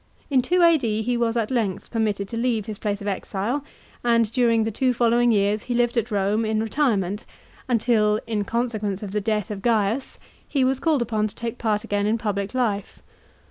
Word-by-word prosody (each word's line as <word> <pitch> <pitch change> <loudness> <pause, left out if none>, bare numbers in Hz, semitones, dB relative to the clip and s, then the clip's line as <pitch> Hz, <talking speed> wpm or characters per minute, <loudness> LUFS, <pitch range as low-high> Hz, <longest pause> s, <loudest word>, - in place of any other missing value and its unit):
In 260 -2 +4
2 355 +7 +2
A.D. 240 -11 +3
he 245 +2 0
was 235 -1 0
at 225 0 -1
length 220 -7 -1
permitted 210 -3 -1
to - - -5
leave 230 -3 0
his 215 -2 -6
place 205 -2 -2
of 200 - -5
exile, 205 +7 -2 0.4
and 230 -2 +3
during 230 -2 +3
the 225 - -1
two 255 +3 +1
following 240 0 +3
years 205 0 +2
he 245 - 0
lived 240 0 +2
at 230 0 0
Rome 205 +1 +1
in 220 0 0
retirement, 215 -6 0 0.5
until, 215 -3 +2
in 215 -3 -1
consequence 215 -3 -2
of 200 - -5
the 210 +1 -1
death 210 -1 -1
of 200 -2 -5
Gaiu^ 225 +2 0 0.3
he 275 -3 +1
was 260 0 +1
called 300 -4 +2
upon 215 -2 0
to 205 - -10
take 235 0 -5
part 215 -1 0
again 205 -2 0
in 220 +2 +2
public 205 0 -3
life. 215 -6 -2
225 Hz, 200 wpm, -24 LUFS, 210-240 Hz, 0.5 s, In